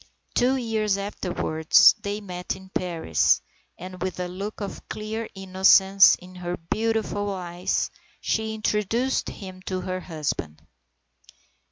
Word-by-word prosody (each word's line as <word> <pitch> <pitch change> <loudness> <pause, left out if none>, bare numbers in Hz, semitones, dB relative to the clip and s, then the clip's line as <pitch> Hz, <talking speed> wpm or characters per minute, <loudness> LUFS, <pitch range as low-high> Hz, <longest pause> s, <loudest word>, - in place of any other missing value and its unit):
Two 255 +2 +3
years 220 -5 0
afterwards 180 -5 +3
they 205 +1 -3
met 180 -3 -4
in 190 0 -13
Paris, 170 - +1 0.4
and 185 0 -9
with 185 -1 -3
a 180 - -2
look 195 +4 -6
of 200 -2 -7
clear 220 +1 -4
innocence 190 +1 +6
in 185 0 -14
her 180 -1 -4
beautiful 210 +2 -1
eyes 180 -1 -2 0.3
she 220 0 -1
introduced 220 +4 0
him 185 -2 -9
to 185 0 -3
her 185 0 -3
husband. 150 - -4
190 Hz, 125 wpm, -25 LUFS, 180-215 Hz, 0.4 s, innocence